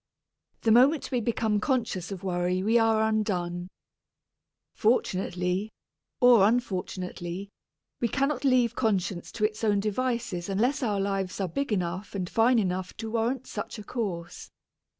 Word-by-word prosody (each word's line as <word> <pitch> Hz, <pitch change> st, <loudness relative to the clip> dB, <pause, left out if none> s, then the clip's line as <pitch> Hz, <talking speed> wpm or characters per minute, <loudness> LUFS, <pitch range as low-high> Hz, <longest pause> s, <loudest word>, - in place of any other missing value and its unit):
The 225 Hz, -, +3 dB
moment 265 Hz, +7 st, +4 dB
we 250 Hz, -2 st, +1 dB
become 220 Hz, -2 st, 0 dB
conscious 220 Hz, -, -1 dB
of 195 Hz, -2 st, -6 dB
worry 180 Hz, 0 st, 0 dB
we 225 Hz, +3 st, +4 dB
are 220 Hz, -1 st, +3 dB
undone. 180 Hz, -5 st, -1 dB, 1.1 s
Fortunately, 185 Hz, -3 st, 0 dB, 0.5 s
or 240 Hz, -5 st, +7 dB
unfortunately, 185 Hz, -4 st, -3 dB, 0.5 s
we 235 Hz, -, +1 dB
cannot 275 Hz, +2 st, 0 dB
leave 250 Hz, -4 st, +3 dB
conscience 190 Hz, -7 st, -1 dB
to 215 Hz, -2 st, +1 dB
its 215 Hz, +1 st, -3 dB
own 205 Hz, -2 st, +3 dB
devices 215 Hz, -4 st, -2 dB
unless 240 Hz, +10 st, +1 dB
our 210 Hz, -5 st, 0 dB
lives 195 Hz, -1 st, -2 dB
are 195 Hz, -, 0 dB
big 275 Hz, +10 st, -3 dB
enough 185 Hz, +1 st, -2 dB
and 185 Hz, -2 st, -2 dB
fine 230 Hz, +6 st, +3 dB
enough 185 Hz, -3 st, -1 dB
to 225 Hz, -1 st, -5 dB
warrant 235 Hz, +3 st, -1 dB
such 210 Hz, +2 st, -6 dB
a 210 Hz, -, -8 dB
course. 185 Hz, -7 st, -5 dB
210 Hz, 140 wpm, -27 LUFS, 185-235 Hz, 1.1 s, or